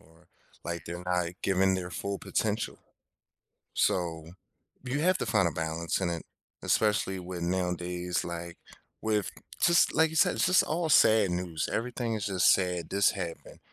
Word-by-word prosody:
or 80 +3 -23 0.4
like, 85 -2 -4
they're 85 +1 -6
not 90 -1 0
giving 95 0 +2
their 90 -1 -4
full 100 +2 -4
potential. 110 0 -2 1.0
So, 80 -2 0 0.5
you 130 +3 -2
have 185 +3 +3
to - - -1
find 95 -6 +2
a - - -1
balance 80 +2 -2
in 90 - 0
it, 85 -1 -4 0.4
especially 105 -3 +1
with, 90 -1 -6
nowadays, 90 0 -1
like, 85 0 -6 0.4
with 105 -3 0 0.3
just 170 0 +4
like 160 0 +4
you 160 - -8
said, - - +4
it's - - +2
just 185 +1 +5
all 165 +1 -1
sad 110 - +5
news. 90 -3 -2
Everything 120 -1 -2
is 105 - -3
just 95 -3 +4
sad. 90 -2 0
"This 100 0 +3
happened, 85 -4 -7
90 Hz, 160 wpm, -29 LUFS, 85-110 Hz, 1.0 s, just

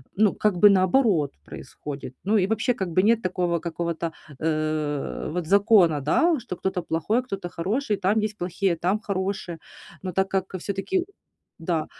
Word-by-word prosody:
ну, 210 0 +3
как 210 -4 +1
бы 205 +3 +8
наоборот 185 - +3
происходит. 135 - -8
Ну 210 +3 +2
и 190 -2 +2
вообще, 225 +4 +1
как 190 -6 -4
бы 185 - +3
нет 230 +2 +4
такого 180 -2 0
какого-то, 170 -1 -3 0.3
э, 155 -2 -2
вот 175 +2 -3
закона, 195 -4 +4
да, 310 - +2
что 235 -6 -6
кто-то 190 +1 -2
плохой, 165 +8 0
а - - -3
кто-то 195 -7 -5
хороший, 210 +7 -1
там 200 +3 +2
есть 215 0 -2
плохие, 175 0 -1
там 185 +6 0
хорошие. 190 -4 -3 0.4
Но 185 -1 -4
так 190 +2 +1
как 190 0 -2
всё-таки 200 - -2 0.6
да, 165 -1 -1
185 Hz, 165 wpm, -25 LUFS, 170-210 Hz, 0.6 s, бы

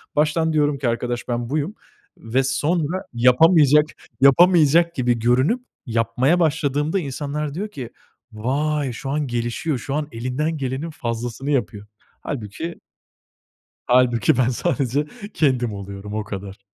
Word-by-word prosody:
baştan 155 +2 +2
diyorum 145 -2 +2
ki 130 -3 0
arkadaş 120 +1 -3
ben 120 0 -2
buyum 155 +7 -2 0.4
ve 125 +4 0
sonra 155 +6 0
yapamayacak 150 +4 +5 0.4
yapamayacak 170 +3 +5
gibi 120 -3 +1
görünüp 130 - +2 0.2
yapmaya 120 +7 +1
başladığımda 155 +2 +1
insanlar 145 0 -4
diyor 195 +7 -3
ki 130 - -7 0.4
vay 140 +5 -1
şu 135 +3 -6
an 150 -1 -1
gelişiyor, 120 +5 -2
şu 135 - -5
an 150 -1 -2
elinden 130 +7 -2
gelenin 135 +3 -3
fazlasını 120 +1 -4
yapıyor. 105 -6 -2 0.3
Hâlbuki, 140 +7 -5 1.1
hâlbuki 125 -2 +3
ben 130 -1 +3
sadece 140 +3 -1 0.3
kendim 125 -7 +1
oluyorum 100 +1 -7
o 110 0 -2
kadar. 100 -1 -7
135 Hz, 125 wpm, -22 LUFS, 120-150 Hz, 1.1 s, yapamayacak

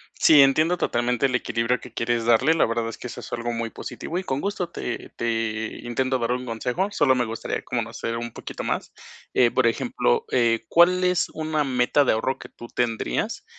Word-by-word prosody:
Sí, 150 -3 +7
entiendo 155 +6 +4
totalmente 120 -2 0
el 125 - -1
equilibrio 115 +1 0
que 125 - -12
quieres 115 0 -1
darle. 125 +7 +4
La 165 - +3
verdad 115 0 -1
es - - -8
que - - -7
eso - - -8
es - - -10
algo 120 0 -2
muy 115 0 -3
positivo, 170 - -6
y 185 - -2
con 135 -5 -2
gusto 195 -3 -2
te 120 - -5
te 115 -1 -2
intento 130 +2 0
dar 115 0 -1
un 125 +1 -2
consejo, 125 - -2
solo 140 -9 +3
me 125 -1 +1
gustaría 115 0 -4
conocer 115 0 -3
un 120 0 -5
poquito - - -7
más. - - -3 0.4
Eh, 120 -2 +4
por 130 -2 +3
ejemplo, 85 - 0
eh, 115 -2 +2
¿cuál 180 +2 +5
es 180 -1 +2
una 155 -1 -1
meta 130 +1 +2
de - - +3
ahorro 130 +4 -1
que - - -10
tú 120 - -11
tendrías 115 - -2
125 Hz, 205 wpm, -24 LUFS, 115-145 Hz, 0.4 s, Sí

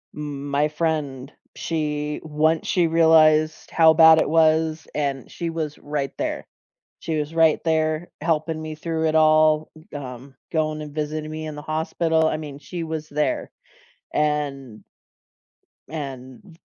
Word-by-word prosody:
m 145 -1 -6
my 145 +2 +1
friend, 150 -4 -2 0.2
she 150 -2 -2
once 155 +1 +1
she 175 -3 +2
realized 155 -1 +4
how 160 -1 +6
bad 160 0 +7
it - - +1
was 160 0 +2
and 140 -3 -2
she 170 -1 -4
was 155 -3 -4
right 145 -2 -3
there. - - -3 0.5
She 160 -1 -3
was 150 +2 -4
right 160 -2 +4
there 160 0 0
helping 160 0 -1
me 155 0 -6
through 160 0 -2
it 155 - -1
all, 155 0 +4 0.2
g - - -10
um, 130 -1 -8 0.2
going 155 -1 -1
and 150 -1 -9
visiting 155 0 -3
me 155 0 -5
in 155 -1 -6
the 150 - -7
hospital, 160 +1 0
I 155 - -1
mean, 145 -2 -8
she 170 +4 -6
was 160 -1 -5
there, 150 - -1 0.6
and 140 -6 -2 1.1
and 140 +2 -8
155 Hz, 145 wpm, -23 LUFS, 150-160 Hz, 1.1 s, bad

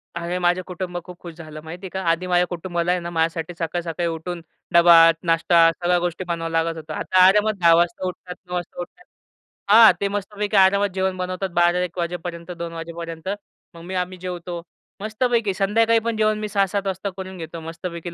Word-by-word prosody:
अरे 170 +1 -3
माझं 180 +1 +2
कुटुंब 180 -1 -5
खूप 180 -1 -11
खुश 170 -2 -9
झालं, 155 -2 -10
माहिती 175 +4 -9
आहे - - -6
का. 190 +1 -4
आधी 170 +2 0
माझ्या 180 0 +3
कुटुंबाला 175 0 -2
आहे 180 - +1
ना 170 - -5
माझ्यासाठी 165 0 -1
सकाळ-सकाळी 170 0 -2
उठून 170 +2 -5 0.3
डबा, 170 0 +7 0.3
नाश्ता, 165 0 +4
सगळ्या 175 +1 0
गोष्टी 175 +1 -3
बनवावं 165 -1 -3
लागत 165 0 0
होतं 155 -1 -7
आता 185 +3 +3
आरामात 210 +3 +4
10 170 -1 +6
वाजता 175 +2 +1
उठतात, 180 0 -7
9 180 - -9
वाजता 175 -1 -5
उठतात. 180 - -11 0.7
हां. 220 +1 +9
ते 200 - +2
मस्तपैकी 205 +1 -2
आरामात 200 +1 +4
जेवण 190 0 -1
बनवतात 185 +1 -3
12-1 175 0 +1
वाजेपर्यंत 170 0 -4
2 170 0 -5
वाजेपर्यंत 165 +1 -7 0.4
मग 170 - -12
मी 185 +2 -6
आम्ही 180 0 -2
जेवतो. 175 -1 -6 0.4
मस्तपैकी 220 -1 0
संध्याकाळी 225 +4 +2
पण 230 - -1
जेवण 215 0 +2
मी 215 - -3
6-7 200 0 0
वाजता 190 +1 -3
करून 190 -1 -7
घेतो 165 0 -7
मस्तपैकी 170 +1 -7
180 Hz, 185 wpm, -22 LUFS, 170-190 Hz, 0.7 s, हां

